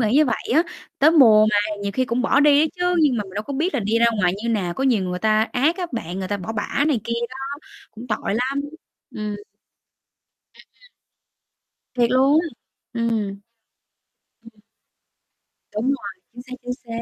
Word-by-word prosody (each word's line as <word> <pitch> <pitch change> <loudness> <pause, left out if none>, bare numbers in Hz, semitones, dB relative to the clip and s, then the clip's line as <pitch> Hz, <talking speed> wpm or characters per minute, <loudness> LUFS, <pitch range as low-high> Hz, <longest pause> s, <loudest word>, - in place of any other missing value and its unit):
nghĩ 220 - +2
như 300 +3 +5
vậy 245 -5 0 0.2
á. 320 - +5 0.4
Tới 300 +3 +6
mùa 220 -9 +7
mà 210 - +2 0.3
nhiều 200 0 -2
khi 255 +5 +1
cũng 245 +1 -1
bỏ 280 - +3
đi 290 -1 +6
á 315 - +4
chứ, 360 0 +2
nhưng 280 -5 +3
mà 210 - -2
mình 190 - -13
đâu 210 - -2
có 280 - -7
biết 320 +7 -1
là - - +1
đi 215 +3 +1
ra 235 - +4
ngoài 180 -2 +3
như 235 - -2
nào, 190 -6 -1
có 270 - -2
nhiều 230 -8 +2
người 180 0 -3
ta 215 +1 +2
ác 285 +8 +2
á 360 -2 -3
bạn, 185 -6 -4
người 185 - -4
ta 205 - -1
bỏ 200 +3 -6
bả 225 +6 -1
này 260 -8 +1
kia 235 - -3 0.2
đó, 260 - -9 0.5
cũng 230 +3 -11
tội 210 -1 -2
lắm, 260 +4 -1 0.5
ừm. 210 -1 -4 1.2
Ừm, - - -17
ừm. - - -25 1.1
Thiệt 240 -2 +2
luôn 270 +4 +4
á? - - -3 0.5
Ừm. 230 0 0 1.3
Ừm. 225 -2 -17 1.2
Đúng 215 - -1
rồi, 205 -9 -3
chính 245 - -9
xác, 255 0 -11
chính 250 0 -3
xác. 230 0 -5
235 Hz, 200 wpm, -22 LUFS, 210-275 Hz, 1.3 s, mùa